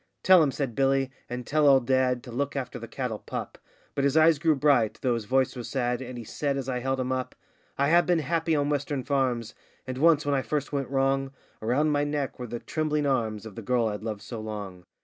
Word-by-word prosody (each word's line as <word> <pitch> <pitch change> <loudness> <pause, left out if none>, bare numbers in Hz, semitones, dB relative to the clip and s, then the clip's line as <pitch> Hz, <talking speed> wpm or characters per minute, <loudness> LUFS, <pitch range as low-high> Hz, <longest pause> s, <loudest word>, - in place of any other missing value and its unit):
Tell 185 -2 +7
'em,' 150 - +3
said 135 -3 -3
Billy, 135 +1 +1 0.2
'and 125 0 -5
tell 150 +2 +2
old 135 -3 +5
dad, 130 -1 +2
to 125 - -9
look 140 +4 -2
after 130 -2 -4
the 115 - -8
cattle 115 -2 -4
pup;' - - -6 0.3
But 140 - -1
his 140 +2 +2
eyes 160 -1 +5
grew 155 0 +3
bright, 135 -6 +3
though 125 -2 +2
his 115 -2 -3
voice 130 +4 +1
was 120 -2 -6
sad, 125 -2 -1
and 125 -1 -7
he 120 - -6
said, 140 +5 -2
as 135 -2 -4
I 125 -2 -1
held 130 +1 -1
him 130 0 -1
up: 130 -1 -3 0.4
'I 140 - +2
have 175 +2 +5
been 175 -1 +3
happy 165 +1 0
on 145 -1 +1
western 145 -2 -1
farms. 125 -4 0 0.3
And 130 0 -5
once, 155 -1 +4
when 145 - +1
I 135 - +2
first 145 +1 -3
went 140 -2 -1
wrong, 135 0 0 0.3
Around 135 +8 +1
my 145 0 +2
neck 145 -3 -2
were 125 - -5
the 120 +1 -4
trembling 150 +3 -1
arms 115 -6 -1
of 110 - -8
the 115 - -7
girl 120 +1 +1
I'd 105 -1 -5
loved 110 -2 -5
so 115 - -6
long. 100 -4 -7
135 Hz, 240 wpm, -27 LUFS, 120-145 Hz, 0.4 s, Tell